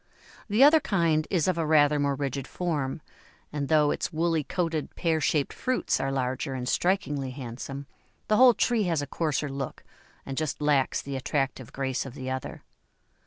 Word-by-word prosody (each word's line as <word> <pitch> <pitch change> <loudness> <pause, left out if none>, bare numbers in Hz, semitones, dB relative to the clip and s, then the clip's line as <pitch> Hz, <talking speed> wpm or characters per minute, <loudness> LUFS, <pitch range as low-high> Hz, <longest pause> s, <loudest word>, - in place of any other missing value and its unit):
The 215 +6 +5
other 305 +3 +8
kind 165 - +1
is 175 -4 +1
of 180 -2 +1
a - - +1
rather 150 -1 +4
more 140 -1 +1
rigid 140 -1 -3
form, 150 -5 -2 0.5
and 145 -2 -2
though 150 -1 +4
its - - -2
woolly 165 -1 +1
coated, 165 -1 -2
pear 160 -3 0
shaped 150 -3 +1
fruits 255 - 0
are 135 +1 -1
larger 130 +1 -2
and 125 -1 -4
strikingly 150 -6 0
handsome, 130 +2 -7 0.4
the 215 - +3
whole 250 -1 +7
tree 230 -4 +2
has 165 -5 0
a - - -3
coarser 150 0 -1
look, 135 -1 -5 0.4
and 135 -1 -5
just 155 -4 -2
lacks 145 -3 +1
the 140 -1 -5
attractive 135 -1 -2
grace 130 -1 -2
of 130 - -10
the 130 -2 -5
other. 130 -1 -5
145 Hz, 175 wpm, -27 LUFS, 135-165 Hz, 0.5 s, other